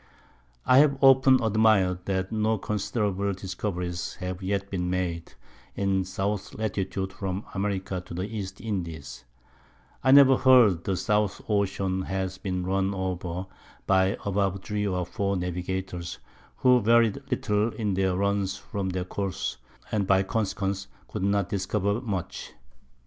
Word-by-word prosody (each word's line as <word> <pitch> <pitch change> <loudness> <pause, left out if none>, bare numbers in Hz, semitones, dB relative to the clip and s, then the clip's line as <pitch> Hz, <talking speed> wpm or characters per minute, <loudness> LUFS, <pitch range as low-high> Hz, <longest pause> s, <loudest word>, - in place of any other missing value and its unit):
I 125 - +6
have 140 -2 +4
often 135 -1 +7
admir'd 105 -5 +3
that 95 -1 -1
no 110 0 +1
considerable 100 -1 -1
Discoveries 90 -2 -4
have 90 0 -5
yet 100 +1 -1
been 90 -2 -1
made 90 -2 -3 0.4
in 95 -1 +1
South 100 +2 -3
Latitude 95 -3 -2
from 95 +1 -4
America 95 -2 -2
to - - -7
the 90 - -2
East 100 -2 -5
Indies: 80 - -5 0.8
I 130 - +2
never 135 -1 +8
heard 120 -10 +5
the 95 -2 0
South 105 -1 +1
Ocean 95 -2 0
has 95 0 -3
been 90 -2 -3
run 95 +1 0
over 90 -1 -3 0.4
by 95 0 +3
above 100 -1 0
three 105 -1 -2
or 90 -2 -1
four 100 +2 -1
Navigators, 90 0 -4 0.4
who 125 -1 +5
varied 115 +2 +3
little 110 -3 0
in 105 -3 -1
their 95 -1 +1
Runs 100 0 0
from 95 0 -4
their 90 0 -2
Course, 95 -8 -3 0.3
and 100 -3 0
by 95 0 +4
consequence 100 -1 -2 0.2
could - - -5
not 100 -1 +1
discover 100 +2 -1
much. 100 -8 -5
95 Hz, 140 wpm, -27 LUFS, 95-105 Hz, 0.8 s, never